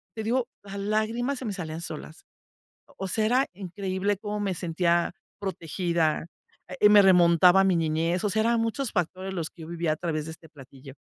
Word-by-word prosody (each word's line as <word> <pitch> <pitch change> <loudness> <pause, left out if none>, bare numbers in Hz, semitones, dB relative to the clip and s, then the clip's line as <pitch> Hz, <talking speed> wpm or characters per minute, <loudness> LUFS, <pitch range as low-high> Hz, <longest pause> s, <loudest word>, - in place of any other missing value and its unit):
te 220 - -4
digo, 240 +2 0 0.2
las 200 0 -8
lágrimas 220 +6 -1
se 260 - -6
me 210 - -2
salían 165 -3 -5
solas. 160 -1 -8 0.8
O 195 - -3
sea, 215 +3 +1
era 255 +4 +3
increíble 195 +1 -2
cómo 210 +1 -4
me 195 -2 -1
sentía 170 0 0 0.3
protegida, 170 -4 -1 0.4
eh, 185 +3 +3
me 210 -1 +8
remontaba 180 0 +6
a - - +4
mi 190 -2 +3
niñez. 165 +3 0
O 205 - +1
sea, 220 - +1
eran 230 +1 +2
muchos 230 +2 -2
factores 185 +1 -2
los 165 -3 -3
que 165 - -13
yo 160 - -9
vivía 170 -2 -1
a - - -2
través 155 -2 -3
de 160 - -6
este 160 0 -15
platillo. 135 -2 -14
185 Hz, 195 wpm, -26 LUFS, 165-210 Hz, 0.8 s, me